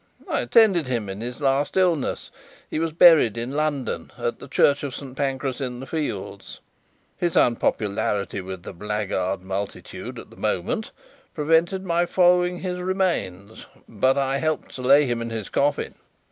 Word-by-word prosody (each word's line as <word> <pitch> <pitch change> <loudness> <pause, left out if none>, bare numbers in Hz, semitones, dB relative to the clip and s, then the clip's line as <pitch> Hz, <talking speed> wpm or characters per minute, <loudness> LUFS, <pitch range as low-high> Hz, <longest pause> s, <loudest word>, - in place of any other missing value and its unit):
I - - 0
attended 195 - +4
him 115 -5 -2
in 95 +2 -6
his 120 +4 -6
last 140 +4 +1
illness. 175 -7 +1 0.4
He - - -3
was 165 0 -1
buried 155 -9 +6
in 120 +2 -3
London, 145 -2 -2
at - - -3
the - - -10
church 140 0 +3
of 140 -3 -4
Saint 135 -2 -8
Pancras 135 -1 -2
in 125 -2 -4
the 135 - -7
Fields. 135 -9 -5 0.6
His 175 -2 -1
unpopularity 105 -4 +1
with 95 -1 -7
the - - -8
blackguard 100 -1 -2
multitude 95 +2 -6
at - - -11
the - - -14
moment - - -2 0.5
prevented 165 +5 +2
my 175 0 +1
following 180 0 +3
his 180 -1 -3
remains, 170 - -2 0.2
but 130 +5 +1
I 135 0 +1
helped 155 0 -2
to 130 - -7
lay 140 +3 +5
him 120 -2 -1
in 115 - -4
his 110 -3 -5
coffin." 145 +1 0
135 Hz, 160 wpm, -24 LUFS, 110-165 Hz, 0.6 s, buried